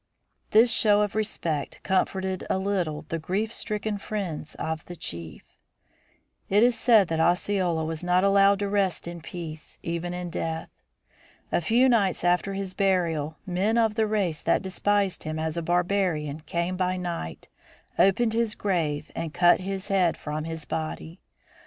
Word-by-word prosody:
This 230 +3 +5
show 210 -2 +4
of 205 - -2
respect 170 -9 -2
comforted 190 0 0
a - - +2
little 190 -6 -1
the 165 - -2
grief 205 +7 -2
stricken 210 -2 -2
friends 185 -8 -4
of 160 0 -3
the 175 - -8
chief. 85 - -6 1.1
It 205 +3 +5
is 245 0 +4
said 225 -4 +5
that 165 -1 -1
Osceola 175 -1 +1
was 160 +1 -4
not 180 +1 +3
allowed 200 0 +5
to 200 0 -2
rest 195 -4 0
in 170 -1 -7
peace, 160 -2 -7
even 170 +1 -3
in 180 -1 -5
death. 160 -1 -3 0.8
A - - +2
few 235 +9 +4
nights 205 -9 +2
after 180 +3 +1
his 195 -1 -4
burial 165 -6 0
men 195 +5 +1
of 225 -2 +3
the 220 0 +1
race 195 -7 0
that - - +1
despised 195 0 0
him 155 0 -4
as 160 0 -2
a 170 - -1
barbarian 175 -4 0
came 170 +3 -1
by 185 0 0
night, 170 - -5 0.5
opened 220 +4 +4
his 225 -1 0
grave 160 -6 -1
and 165 -1 -4
cut 175 0 +5
his 195 +1 -4
head 185 -4 +2
from 150 +1 -4
his 160 -1 -5
body. 160 +2 -5
180 Hz, 160 wpm, -26 LUFS, 165-200 Hz, 1.1 s, This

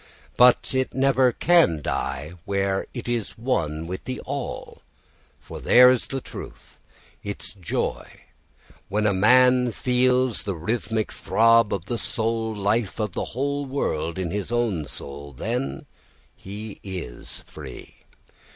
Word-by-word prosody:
But 125 +1 +5
it 130 0 -1
never 130 -1 +4
can 160 - +4
die 70 +2 -3
where 100 -1 0
it 120 -2 -7
is 120 -3 -2
one 80 - -1
with 90 +2 -6
the 130 0 -4
all, 140 -1 -5 0.6
for 70 - -9
there 125 0 +7
is 130 - 0
its 135 -1 -4
truth, - - -10 0.4
its 100 -2 -6
joy. 95 -5 -4 0.7
When 105 +2 0
a 105 - +3
man 125 +5 +5
feels 125 +1 +2
the 100 -3 -3
rhythmic 110 +5 -2
throb 115 -1 +4
of 95 -3 -2
the 120 +3 -3
soul 115 -1 -1
life 105 +1 0
of 105 -2 -1
the - - -2
whole 140 +1 0
world 85 - -2
in 90 -3 -2
his 105 +3 -3
own 115 -10 0
soul, 70 +1 -8
then 125 +7 -3 0.6
is 105 +2 -7
he 90 -11 -7
free. - - -10
110 Hz, 135 wpm, -24 LUFS, 95-125 Hz, 0.7 s, there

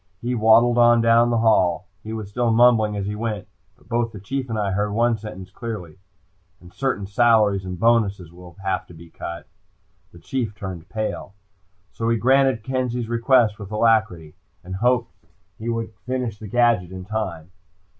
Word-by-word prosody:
He 120 +4 -2
waddled 115 +1 +4
on 120 0 +6
down 115 +1 +4
the 120 - +1
hall. 95 -4 +3 0.2
He 110 - -8
was 110 -2 -5
still 120 +4 -1
mumbling 110 -2 +4
as 100 - -3
he 105 - -3
went, 105 -2 -4 0.3
but - - -25
both 120 0 -1
the 105 - -9
Chief 130 +6 -4
and 110 - -2
I 100 -2 -1
heard 105 +2 -1
one 120 +2 +2
sentence 95 -3 -9
clearly. 100 -7 -7 0.6
"And 90 0 -16
certain 130 -7 -2
salaries 105 -2 +3
and 90 -1 -6
bonuses 100 -7 +1
will 90 -1 -14
have 95 -1 -2
to 85 - -14
be 85 0 -14
cut." 85 -2 -7 0.6
The - - -15
Chief 110 - -4
turned 95 -4 -7
pale. 110 -2 -4 0.6
So 115 0 -2
he 115 - +2
granted 130 -1 +3
Kenzie's 125 -2 -2
request 115 -2 +3
with 100 -2 -8
alacrity 105 -8 +1 0.3
and 95 +1 -6
hoped 125 +2 +1 0.5
he 115 +2 -4
would 115 -1 -3
finish 125 -5 -3
the 110 - -8
gadget 115 -5 +2
in 95 -1 -8
time. 95 -6 -4
110 Hz, 175 wpm, -22 LUFS, 95-120 Hz, 0.6 s, on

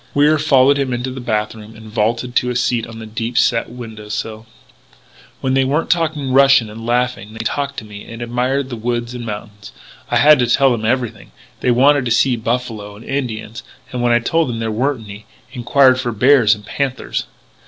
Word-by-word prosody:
Wier 150 +2 +4
followed 140 -2 +4
him 135 -2 -1
into 125 +2 -3
the 130 - -7
bath 105 -3 -1
room 110 0 -12
and 110 0 -13
vaulted 115 +3 -1
to 125 - +1
a 125 - -3
seat 120 -2 0
on 115 -1 -10
the 110 - -8
deep 115 +2 -4
set 115 -1 +2
window 110 -3 -9
sill: 110 +1 -5 0.5
" - - -27
When 130 - 0
they 135 0 +3
weren't 145 +5 0
talking 155 -5 0
Russian 135 -4 +5
and 115 +2 -8
laughing 120 -3 -1
they 110 0 -6
talked 140 +3 -2
to 110 - -6
me 105 -1 -10
and 115 - -8
admired 125 +3 -1
the - - -3
woods 120 +1 -3
and 120 -1 -6
mountains. 105 -1 -8 0.4
I - - +2
had 150 -1 +6
to 125 - +2
tell 135 +2 +4
them 115 -2 -2
everything 120 -1 -2 0.3
they - - 0
wanted 135 +3 +4
to 120 - -2
see 125 +2 +3
buffalo 115 -3 -3
and 110 - -13
Indians. 115 -5 -4 0.3
And 125 - -3
when 120 0 +2
I 120 - +5
told 160 +5 0
them 115 - -3
there 115 -1 -2
weren't 125 +1 -1
any, 105 +1 -11 0.3
enquired 130 +1 +3
for 120 -2 -2
bears 120 -1 +4
and 105 -1 -14
panthers. 135 0 -3
120 Hz, 210 wpm, -18 LUFS, 110-130 Hz, 0.5 s, had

